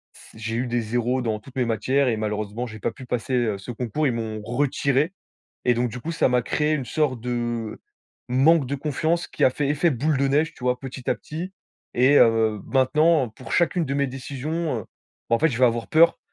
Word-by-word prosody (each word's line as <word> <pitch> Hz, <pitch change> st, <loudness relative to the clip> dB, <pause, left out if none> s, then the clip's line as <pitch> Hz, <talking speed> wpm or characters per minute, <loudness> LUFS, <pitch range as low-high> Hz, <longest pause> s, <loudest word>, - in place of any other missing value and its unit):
s -, -, -15 dB
j'ai 110 Hz, 0 st, -4 dB
eu 125 Hz, +2 st, -1 dB
des 120 Hz, 0 st, 0 dB
0 120 Hz, +3 st, 0 dB
dans 110 Hz, -3 st, -1 dB
toutes 125 Hz, +4 st, -16 dB
mes 125 Hz, -, +2 dB
matières 130 Hz, +5 st, +1 dB
et 120 Hz, -, +2 dB
malheureusement, 105 Hz, +2 st, -3 dB
j'ai 110 Hz, -3 st, -9 dB
pas -, -, -1 dB
pu 130 Hz, -, -11 dB
passer, 125 Hz, +1 st, -3 dB
heu, 120 Hz, -5 st, +1 dB
ce 100 Hz, +5 st, -7 dB
concours. 125 Hz, +5 st, -1 dB
Ils 125 Hz, -, +1 dB
m'ont 110 Hz, -2 st, -4 dB
retiré 140 Hz, +5 st, 0 dB, 0.5 s
et 125 Hz, -, +5 dB
donc, 120 Hz, +1 st, 0 dB
du 125 Hz, -, -6 dB
coup, 160 Hz, +7 st, -4 dB
ça 155 Hz, -, +2 dB
m'a 125 Hz, 0 st, +2 dB
créé 150 Hz, +5 st, 0 dB
une 140 Hz, -4 st, -1 dB
sorte 140 Hz, -3 st, 0 dB
de 120 Hz, -2 st, -3 dB, 0.5 s
manque 140 Hz, +3 st, +4 dB
de 140 Hz, -, -2 dB
confiance, 155 Hz, +4 st, -1 dB
qui -, -, -3 dB
a -, -, +7 dB
fait 140 Hz, +2 st, -2 dB
effet 150 Hz, +4 st, +2 dB
boule 145 Hz, +4 st, 0 dB
de 140 Hz, +1 st, +2 dB
neige, 150 Hz, +4 st, +1 dB
tu 125 Hz, -, -14 dB
vois? 125 Hz, 0 st, +1 dB
Petit 130 Hz, -1 st, -6 dB
à -, -, +2 dB
petit 170 Hz, +5 st, -7 dB, 0.4 s
et 130 Hz, +4 st, +5 dB
heu, 110 Hz, -2 st, +3 dB
maintenant, 145 Hz, +1 st, +3 dB
pour 115 Hz, +2 st, -11 dB
chacune 170 Hz, 0 st, +2 dB
de 135 Hz, -, -2 dB
mes 140 Hz, 0 st, +2 dB
décisions, 140 Hz, +2 st, -3 dB
heu, -, -, -14 dB, 0.4 s
bah, 115 Hz, -, +4 dB
en -, -, -1 dB
fait, 160 Hz, -, +4 dB
je 120 Hz, -, -3 dB
vais 130 Hz, -, +7 dB
avoir 115 Hz, -1 st, 0 dB
peur. 165 Hz, +2 st, +5 dB
125 Hz, 230 wpm, -24 LUFS, 115-145 Hz, 0.5 s, a